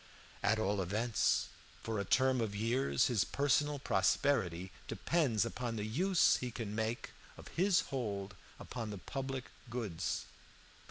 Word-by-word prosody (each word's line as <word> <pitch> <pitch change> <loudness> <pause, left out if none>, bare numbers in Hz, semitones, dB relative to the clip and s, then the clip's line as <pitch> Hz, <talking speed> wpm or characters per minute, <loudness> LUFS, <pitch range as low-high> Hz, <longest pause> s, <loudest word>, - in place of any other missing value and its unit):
At 110 - +3
all 105 -2 +1
events, 105 +5 +1 0.3
for 110 -2 -2
a - - 0
term 130 +3 +3
of 105 -3 -2
years, 120 +4 +2
his 115 -6 +2
personal 145 +1 +1
prosperity 95 - +1 0.2
depends 115 - +1
upon 120 0 -3
the 105 -1 -2
use 180 - +3
he 125 - -3
can 115 -3 -5
make 110 +2 -2 0.3
of - - -11
his 185 +1 +3
hold 100 -7 -3 0.3
upon 115 -3 -5
the 105 - -5
public 135 +5 -5 0.2
goods. 110 -9 -2
115 Hz, 140 wpm, -35 LUFS, 105-135 Hz, 0.3 s, At